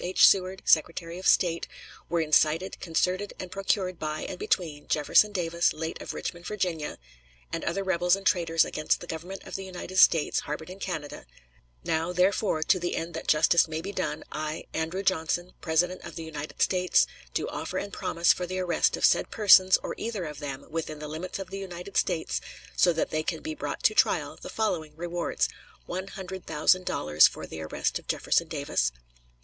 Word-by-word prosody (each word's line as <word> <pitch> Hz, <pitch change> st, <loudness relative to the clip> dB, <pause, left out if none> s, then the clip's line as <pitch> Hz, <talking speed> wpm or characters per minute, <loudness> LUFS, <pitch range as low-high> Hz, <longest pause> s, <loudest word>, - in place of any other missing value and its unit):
H. 185 Hz, +1 st, +5 dB
Seward, 190 Hz, 0 st, +3 dB
Secretary 165 Hz, +2 st, +2 dB
of 185 Hz, -, -2 dB
State, 170 Hz, -2 st, +3 dB, 0.4 s
were 170 Hz, 0 st, +1 dB
incited, 155 Hz, +3 st, +2 dB
concerted, 185 Hz, +3 st, -1 dB
and 185 Hz, -1 st, -6 dB
procured 190 Hz, -2 st, -1 dB
by 155 Hz, 0 st, -3 dB
and 180 Hz, -, -6 dB
between 155 Hz, -5 st, -1 dB
Jefferson 155 Hz, +7 st, +4 dB
Davis, 170 Hz, -3 st, +1 dB
late 160 Hz, +1 st, -5 dB
of -, -, -6 dB
Richmond, 175 Hz, 0 st, -5 dB
Va.,... 180 Hz, -7 st, -2 dB, 0.6 s
and -, -, -2 dB
other 195 Hz, +3 st, -1 dB
rebels 180 Hz, -1 st, +3 dB
and 195 Hz, 0 st, -9 dB
traitors 165 Hz, -3 st, +3 dB
against 155 Hz, 0 st, 0 dB
the -, -, -8 dB
Government 175 Hz, +4 st, -7 dB
of -, -, -11 dB
the 195 Hz, -, -4 dB
United 185 Hz, 0 st, -7 dB
States, 165 Hz, -4 st, +5 dB
harbored 155 Hz, +4 st, -6 dB
in 190 Hz, -, -10 dB
Canada; 160 Hz, -, -5 dB, 0.6 s
Now, 160 Hz, +2 st, 0 dB
therefore, 180 Hz, -2 st, +2 dB
to 185 Hz, -, +3 dB
the 175 Hz, 0 st, -2 dB
end 165 Hz, +1 st, -4 dB
that 160 Hz, -, -6 dB
justice 160 Hz, +3 st, +5 dB
may 160 Hz, 0 st, -3 dB
be 195 Hz, +5 st, -5 dB
done, -, -, -3 dB
I, 155 Hz, +1 st, -4 dB
Andrew 165 Hz, +5 st, -2 dB
Johnson, 175 Hz, -1 st, 0 dB
President 180 Hz, +3 st, +1 dB
of -, -, -9 dB
the 165 Hz, -, -5 dB
United 155 Hz, -2 st, -3 dB
States, 180 Hz, -1 st, +3 dB, 0.3 s
do -, -, 0 dB
offer -, -, -4 dB
and 200 Hz, -, -4 dB
promise 170 Hz, +1 st, +2 dB
for 180 Hz, -, -4 dB
the 185 Hz, +1 st, -4 dB
arrest 180 Hz, -2 st, +1 dB
of -, -, +3 dB
said -, -, +3 dB
persons 190 Hz, -3 st, +6 dB
or -, -, -3 dB
either 220 Hz, -6 st, -3 dB
of 150 Hz, -2 st, -7 dB
them, 140 Hz, -3 st, -6 dB
within 155 Hz, -1 st, -3 dB
the 150 Hz, 0 st, -7 dB
limits 160 Hz, +4 st, -5 dB
of 190 Hz, -1 st, -7 dB
the 195 Hz, -, -5 dB
United 185 Hz, 0 st, -8 dB
States, 170 Hz, -3 st, 0 dB, 0.3 s
so 180 Hz, -, +5 dB
that 165 Hz, -, -1 dB
they 155 Hz, -, 0 dB
can -, -, -3 dB
be 315 Hz, -, -3 dB
brought -, -, -5 dB
to -, -, +5 dB
trial, -, -, +2 dB
the -, -, -8 dB
following 165 Hz, -9 st, -2 dB
rewards: 175 Hz, +1 st, -1 dB, 0.4 s
One 185 Hz, +2 st, -4 dB
hundred 190 Hz, -1 st, -8 dB
thousand 180 Hz, +4 st, +3 dB
dollars 75 Hz, +1 st, +5 dB
for -, -, -7 dB
the 80 Hz, -, -8 dB
arrest 80 Hz, -, -2 dB
of -, -, -20 dB
Jefferson -, -, +1 dB
Davis -, -, 0 dB
175 Hz, 190 wpm, -27 LUFS, 160-185 Hz, 0.6 s, persons